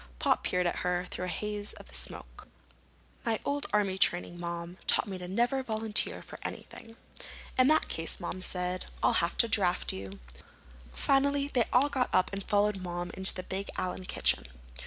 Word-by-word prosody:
Pop -, -, +2 dB
peered 180 Hz, 0 st, +1 dB
at 175 Hz, -, 0 dB
her 180 Hz, 0 st, 0 dB
through 180 Hz, -, -5 dB
the -, -, -2 dB
haze 210 Hz, -1 st, -3 dB
of -, -, -14 dB
smoke. -, -, -4 dB, 0.8 s
"My 225 Hz, -2 st, 0 dB
old 285 Hz, 0 st, -1 dB
army 195 Hz, -2 st, +1 dB
training, 175 Hz, -2 st, +2 dB
Mom, 170 Hz, +1 st, -5 dB
taught -, -, +3 dB
me 190 Hz, -2 st, -5 dB
never 235 Hz, +9 st, 0 dB
to 265 Hz, -, -1 dB
volunteer 220 Hz, -2 st, 0 dB
for -, -, -10 dB
anything." 225 Hz, 0 st, -8 dB, 0.6 s
"In 255 Hz, 0 st, +5 dB
that 310 Hz, +2 st, +4 dB
case," 165 Hz, 0 st, -1 dB
Mom 185 Hz, -, -5 dB
said, 180 Hz, 0 st, -1 dB, 0.2 s
"I'll -, -, +4 dB
have -, -, -1 dB
to -, -, +4 dB
draft -, -, +2 dB
you." 95 Hz, +1 st, -7 dB, 0.7 s
Finally 280 Hz, -, +2 dB
they 245 Hz, -5 st, +2 dB
all 270 Hz, +4 st, +4 dB
got 260 Hz, -3 st, 0 dB
up 185 Hz, -, +3 dB
and 200 Hz, 0 st, -3 dB
followed 205 Hz, 0 st, +2 dB
Mom 175 Hz, 0 st, -4 dB
into 190 Hz, +2 st, +5 dB
the 185 Hz, -, -4 dB
big 195 Hz, +2 st, -4 dB
Allen 185 Hz, 0 st, -3 dB
kitchen. -, -, +1 dB
190 Hz, 180 wpm, -30 LUFS, 180-230 Hz, 0.8 s, In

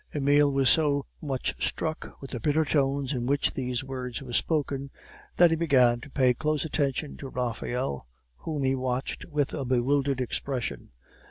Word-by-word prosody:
Emile 145 Hz, 0 st, +4 dB
was 135 Hz, -1 st, +2 dB
so 145 Hz, -2 st, +3 dB, 0.2 s
much 135 Hz, -4 st, -1 dB
struck 160 Hz, -1 st, -3 dB
with 135 Hz, -, -9 dB
the 120 Hz, -, -3 dB
bitter 150 Hz, +6 st, +2 dB
tones 140 Hz, -1 st, +1 dB
in 120 Hz, -2 st, -2 dB
which 140 Hz, +1 st, +1 dB
these 125 Hz, -2 st, -2 dB
words 130 Hz, -3 st, -5 dB
were 130 Hz, -3 st, -8 dB
spoken, 140 Hz, -2 st, 0 dB, 0.5 s
that 175 Hz, -1 st, +6 dB
he -, -, +3 dB
began 130 Hz, -7 st, +3 dB
to 145 Hz, -, -10 dB
pay 130 Hz, -2 st, +3 dB
close 155 Hz, +2 st, -1 dB
attention 145 Hz, -1 st, -1 dB
to 135 Hz, -, -8 dB
Raphael, 125 Hz, -, -3 dB, 0.3 s
whom 150 Hz, -, -3 dB
he 130 Hz, 0 st, +2 dB
watched 130 Hz, 0 st, -2 dB
with 150 Hz, -4 st, -1 dB
a -, -, -2 dB
bewildered 135 Hz, +2 st, +1 dB
expression. 125 Hz, -, -3 dB
135 Hz, 165 wpm, -27 LUFS, 125-145 Hz, 0.5 s, that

